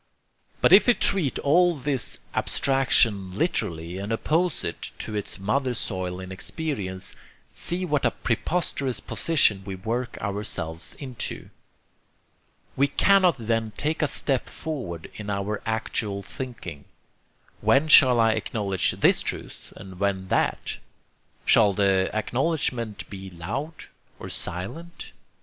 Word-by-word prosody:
But - - +5
if 200 +3 +8
we 245 - +6
treat 175 -9 +1
all 175 +4 +4
this 135 -2 -1 0.2
abstraction 115 -8 +2
literally 85 - -1
and 100 +3 -4
oppose 160 +8 0
it - - -4
to 110 - -6
its 105 -1 -4
mother 125 +6 0
soil 95 -5 -2
in 95 0 -8
experience, 95 - -4 0.4
see 180 +2 -3
what 150 -5 0
a 120 - +4
preposterous 130 - -1
position 110 -7 +2
we 95 -1 -5
work 120 +6 -3
ourselves 100 -6 -4
into. 130 -4 -6 1.2
We 140 +2 +3
cannot 185 +2 +4
then 115 -2 -1
take 155 +2 -1
a 155 - +3
step 135 -2 +1
forward 120 - -5
in 105 -1 -6
our 100 +1 -2
actual 105 -2 -2
thinking. 105 - -7 0.7
When 140 +3 +3
shall 130 -6 +8
I 115 -1 +5
acknowledge 105 -3 0
this - - +3
truth - - -5
and 95 -1 -11
when 95 -2 -1
that? - - 0 0.7
Shall 100 -1 +6
the 95 -1 +2
acknowledgment 120 -1 -1
be 95 -1 -8
loud? 105 - -5 0.3
or - - -8
silent? 165 - -5
115 Hz, 125 wpm, -25 LUFS, 95-140 Hz, 1.2 s, if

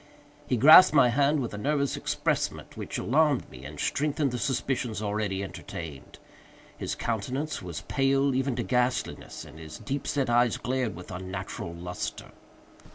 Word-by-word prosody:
He 125 - +1
grasped 155 +6 +9
my 125 -4 +6
hand 140 +4 +2
with 120 - -4
a 105 - -5
nervous 140 +3 0
empressement - - -2
which - - -5
alarmed 145 0 +2
me 65 0 -11
and 75 +1 -9
strengthened 145 - 0
the 125 - -3
suspicions 125 -3 -1
already 105 -2 -2
entertained. 80 -6 -8 0.6
His - - -4
countenance 130 +7 -2
was 85 -4 -6
pale 135 - +2
even 130 0 0
to 120 - -1
ghastliness, 125 +1 -1
and 80 - -13
his 80 -1 -9
deep 140 0 -4
set 140 -2 0
eyes 120 0 +3
glared 125 -2 -2
with 90 +1 -10
unnatural 95 -2 -5
lustre. 90 +1 -5
125 Hz, 155 wpm, -28 LUFS, 95-140 Hz, 0.6 s, grasped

